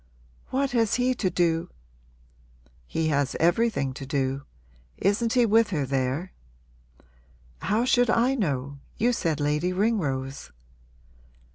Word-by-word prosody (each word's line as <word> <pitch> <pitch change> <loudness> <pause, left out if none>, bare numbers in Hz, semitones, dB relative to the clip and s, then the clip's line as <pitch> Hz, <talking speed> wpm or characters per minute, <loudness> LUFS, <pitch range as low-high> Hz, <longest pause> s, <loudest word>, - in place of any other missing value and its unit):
'What 275 +1 0
has 230 -4 +2
he 250 +1 +2
to 210 -6 -1
do 165 -1 0 0.5
?' - - -32
'He 160 -1 -1
has 140 -2 0
everything 170 - +2
to 135 - -8
do. 135 0 -2 0.5
Isn't 225 +4 +1
he 245 -2 +4
with 225 0 +4
her 150 -7 -1
there?' 135 +6 -2 1.3
'How 220 +4 +1
should 245 -2 +3
I 240 +3 +3
know? 140 - -2 0.2
You 245 +3 +2
said 165 -10 -1
Lady 150 +4 0
Ringrose.' 150 -10 -1
165 Hz, 125 wpm, -26 LUFS, 135-230 Hz, 1.3 s, he